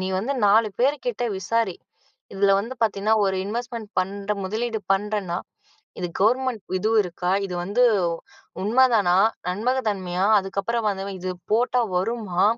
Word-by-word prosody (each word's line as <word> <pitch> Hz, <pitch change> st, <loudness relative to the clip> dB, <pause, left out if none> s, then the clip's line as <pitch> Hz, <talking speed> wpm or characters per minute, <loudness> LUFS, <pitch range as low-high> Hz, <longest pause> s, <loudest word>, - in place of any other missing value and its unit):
நீ 185 Hz, -, -2 dB
வந்து 245 Hz, +8 st, -1 dB
4 215 Hz, +2 st, +5 dB
பேர் 275 Hz, +4 st, +3 dB
கிட்ட 460 Hz, -, -1 dB
விசாரி, 200 Hz, 0 st, -1 dB, 0.6 s
இதுல 195 Hz, 0 st, +3 dB
வந்து 235 Hz, +5 st, -6 dB
பார்த்தீங்கன்னா, 215 Hz, 0 st, +2 dB
ஒரு 190 Hz, 0 st, 0 dB
இன்வெஸ்ட்மெண்ட் 230 Hz, 0 st, -5 dB
பண்ற, 200 Hz, +2 st, -2 dB
முதலீடு 220 Hz, +3 st, -2 dB
பண்றன்னா," 195 Hz, -3 st, -1 dB, 0.6 s
இது 180 Hz, -, -2 dB
கவர்மெண்ட் 245 Hz, +2 st, +2 dB, 0.2 s
இதுவு 220 Hz, +4 st, +1 dB
இருக்கா? 180 Hz, 0 st, -3 dB
இது 180 Hz, -, -6 dB
வந்து 205 Hz, +7 st, +2 dB, 0.8 s
உண்மதானா? 220 Hz, -5 st, +4 dB, 0.3 s
நம்பக 235 Hz, +8 st, 0 dB
தன்மையா? 185 Hz, -2 st, -1 dB
அதுக்கப்புறம் 200 Hz, +4 st, -2 dB
வந்தவ 195 Hz, 0 st, -4 dB
இது 185 Hz, +1 st, -4 dB, 0.2 s
போட்டா 245 Hz, +2 st, +2 dB, 0.2 s
வருமா?" 190 Hz, -2 st, -1 dB
210 Hz, 135 wpm, -24 LUFS, 190-230 Hz, 0.8 s, 4